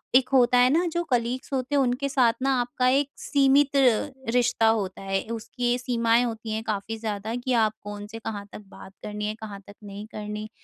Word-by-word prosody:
एक 255 Hz, 0 st, +5 dB
होता 250 Hz, -1 st, +5 dB
है 250 Hz, +1 st, +6 dB
ना 335 Hz, +5 st, +2 dB
जो 345 Hz, 0 st, 0 dB
कलीग्स 245 Hz, +2 st, -1 dB
होते 265 Hz, +2 st, -1 dB
हैं 280 Hz, -, +4 dB
उनके 255 Hz, +2 st, 0 dB
साथ 250 Hz, -5 st, +3 dB
ना 270 Hz, 0 st, +2 dB
आपका 250 Hz, +1 st, 0 dB
एक 280 Hz, +2 st, +2 dB
सीमित 280 Hz, 0 st, +3 dB
रिश्ता 245 Hz, -2 st, +2 dB
होता 200 Hz, -4 st, 0 dB
है, 195 Hz, 0 st, -1 dB
उसकी 240 Hz, +2 st, -1 dB
सीमाएँ 235 Hz, -1 st, +2 dB
होती 225 Hz, -1 st, -5 dB
हैं 220 Hz, +1 st, -2 dB
काफ़ी 215 Hz, +1 st, -3 dB
ज़्यादा 215 Hz, 0 st, -4 dB
कि 245 Hz, +1 st, -2 dB
आप 220 Hz, -2 st, +3 dB
कौन-से, 205 Hz, +2 st, -7 dB
कहाँ 205 Hz, -3 st, -5 dB
तक -, -, -9 dB
बात 190 Hz, -, -13 dB
करनी 210 Hz, 0 st, -4 dB
है, 210 Hz, -, -1 dB
कहाँ 210 Hz, -3 st, -8 dB
तक 205 Hz, -, -12 dB
नहीं 205 Hz, +1 st, -8 dB
करनी 210 Hz, 0 st, -6 dB
230 Hz, 195 wpm, -25 LUFS, 215-255 Hz, -, है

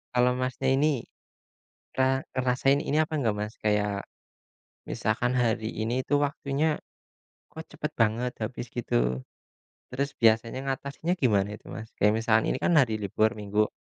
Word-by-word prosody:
Kalau 125 Hz, 0 st, +4 dB
Masnya 130 Hz, +1 st, -1 dB
ini 140 Hz, -2 st, +2 dB, 0.9 s
pernah 130 Hz, 0 st, +2 dB, 0.2 s
ngerasain 130 Hz, +2 st, +2 dB
ini 145 Hz, -, 0 dB
apa 155 Hz, 0 st, 0 dB
enggak, 115 Hz, -8 st, +1 dB
Mas, 105 Hz, +1 st, -4 dB
kayak 105 Hz, -1 st, 0 dB, 0.8 s
misalkan 120 Hz, +3 st, 0 dB
hari 115 Hz, -3 st, +1 dB
ini 120 Hz, +4 st, 0 dB
itu -, -, +1 dB
waktunya 145 Hz, +1 st, 0 dB, 0.7 s
kok 160 Hz, -, -8 dB
cepat 150 Hz, +1 st, -4 dB
banget 115 Hz, +2 st, +2 dB
habis 120 Hz, +2 st, -4 dB
gitu. 65 Hz, -, 0 dB, 0.7 s
Terus 140 Hz, +2 st, -1 dB
biasanya 115 Hz, +2 st, +3 dB
ngatasinya 140 Hz, +5 st, -2 dB
gimana 105 Hz, -, +2 dB
itu, -, -, -18 dB
Mas? 110 Hz, 0 st, -7 dB
Kayak 105 Hz, +1 st, +3 dB
misalkan 110 Hz, -1 st, +3 dB
ini -, -, -1 dB
kan 175 Hz, -, +3 dB
hari 125 Hz, -7 st, +4 dB
libur 105 Hz, +2 st, +1 dB
Minggu 105 Hz, +1 st, +1 dB
125 Hz, 145 wpm, -27 LUFS, 110-135 Hz, 0.9 s, Kalau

